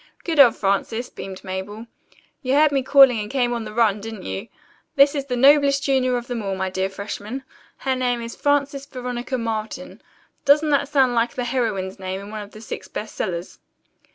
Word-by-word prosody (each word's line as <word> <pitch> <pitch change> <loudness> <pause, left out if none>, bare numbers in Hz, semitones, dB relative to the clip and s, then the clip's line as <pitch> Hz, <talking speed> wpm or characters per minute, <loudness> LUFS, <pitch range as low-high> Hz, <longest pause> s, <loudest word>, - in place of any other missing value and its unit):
"Good 325 -3 -1
old 245 -5 +8
Frances," 220 +5 -1
beamed 190 0 -8
Mabel. 195 +4 -6 0.6
"You 260 -1 0
heard 300 0 +5
me 275 -1 +1
calling 265 -3 +6
and 210 0 -4
came 245 -2 0
on 235 -2 -3
the 215 - -7
run, 215 -2 +2
didn't 220 -1 -7
you? 95 0 -5 0.5
This 280 +1 +6
is 280 -2 -2
the 250 -2 -2
noblest 280 +1 +5
junior 260 -2 +2
of 240 - -5
them 245 -2 -4
all, 195 -2 -2
my 190 0 -2
dear 190 +1 -1
freshmen. 205 +6 -6 0.3
Her 265 -1 -1
name 250 -1 0
is 230 0 -6
Frances 280 -1 0
Veronica 250 -1 -4
Marlton. 230 +3 -5 0.4
Doesn't 300 +2 +4
that 285 0 +2
sound 265 -4 +3
like 235 0 0
the 250 - -2
heroine's 215 -7 -2
name 190 0 -4
in 200 +1 -9
one 215 -1 -5
of 205 - -9
the 215 - -13
six 225 - -7
best 215 +1 -6
sellers?" 175 -1 -4
240 Hz, 200 wpm, -22 LUFS, 210-275 Hz, 0.6 s, old